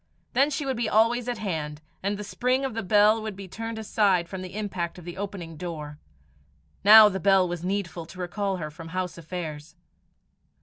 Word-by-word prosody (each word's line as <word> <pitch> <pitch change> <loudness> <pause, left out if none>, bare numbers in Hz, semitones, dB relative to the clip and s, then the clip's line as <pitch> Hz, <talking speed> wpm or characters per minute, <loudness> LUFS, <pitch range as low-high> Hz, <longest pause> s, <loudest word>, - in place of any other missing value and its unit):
Then 275 +4 +4
she 295 0 -3
would 265 -3 -1
be 235 - 0
always 230 +3 +3
at 240 - -2
hand, 155 -8 -3 0.2
and 200 +1 -1
the 210 - -5
spring 255 +6 0
of 265 - -3
the 225 - -2
bell 210 +2 +4
would 215 -2 -5
be 195 0 -9
turned 225 +4 -6
aside 200 -5 +2
from 190 +1 -6
the 185 +1 -8
impact 185 -5 -3
of 175 - -11
the 175 - -7
opening 190 -5 -6
door. 150 -4 -6 0.8
Now 215 +1 +10
the 190 -2 -2
bell 190 0 +4
was 175 -1 -5
needful 180 -3 -3
to 180 +2 -12
recall 190 +2 -2
her 155 -3 -5
from 160 +2 -10
house 180 0 -4
affairs. 160 -2 -6
190 Hz, 200 wpm, -26 LUFS, 170-215 Hz, 0.8 s, Now